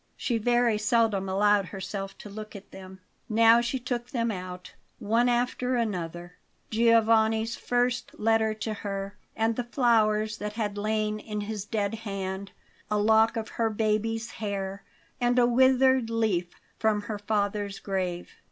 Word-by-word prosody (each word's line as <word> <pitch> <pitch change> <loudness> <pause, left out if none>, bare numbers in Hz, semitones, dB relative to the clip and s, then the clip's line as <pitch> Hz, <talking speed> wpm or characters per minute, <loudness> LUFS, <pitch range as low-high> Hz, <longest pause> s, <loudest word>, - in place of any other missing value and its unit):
She 235 -3 -1
very 240 -1 +2
seldom 210 -3 +1
allowed 205 +1 +3
herself 195 0 -6
to - - -10
look 215 +1 -9
at 200 0 -11
them. 190 0 -11 0.3
Now 230 +1 +6
she 240 +3 -1
took 245 -1 -4
them 235 -2 -1
out, 180 -2 -7 0.2
one 230 +4 +2
after 250 +1 0
another: 175 -6 -3 0.3
Giovanni's 225 0 +3
first 245 0 -1
letter 220 0 +2
to 215 0 -3
her, 200 -1 -5 0.2
and 225 +1 +1
the 245 - -2
flowers 220 -4 +2
that 210 0 -4
had 210 -2 -2
lain 215 0 -1
in 210 -1 -5
his 205 -1 -5
dead 210 -1 -1
hand; 195 -3 -5 0.4
a 210 - +1
lock 220 +2 +4
of 220 -1 -4
her 230 -1 0
baby's 220 +1 -1
hair 200 -2 -4 0.4
and 245 0 +2
a 245 - +6
withered 260 0 +4
leaf 210 -7 -1 0.2
from 215 -2 +2
her 210 0 -5
father's 205 -1 -1
grave. 185 -3 -3
215 Hz, 150 wpm, -27 LUFS, 200-230 Hz, 0.4 s, Now